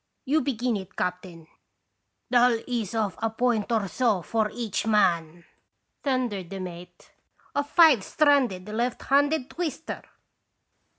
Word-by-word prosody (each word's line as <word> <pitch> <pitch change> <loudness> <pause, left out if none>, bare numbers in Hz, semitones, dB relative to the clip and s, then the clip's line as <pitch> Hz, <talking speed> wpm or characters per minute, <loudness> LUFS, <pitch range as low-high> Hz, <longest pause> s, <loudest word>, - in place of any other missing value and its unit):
You 300 +4 +2
begin 245 -4 -1
it, 190 -1 -10
captain." 180 -2 -4 0.9
"That'll 245 -2 +4
ease 230 -4 -3
off 215 -3 -1
a 225 - +1
point 230 -1 0
or 220 -3 +1
so 215 -4 0
for 220 +2 0
each 225 -2 -3
man," 175 -6 +1 0.6
thundered 245 -10 -1
the 195 - -6
mate, 175 -1 -9 0.4
"a 285 - +1
five 295 - +5
stranded, 260 -12 +2
left 235 +3 -2
handed 285 0 +2
twister 325 -3 -4
225 Hz, 125 wpm, -26 LUFS, 190-255 Hz, 0.9 s, five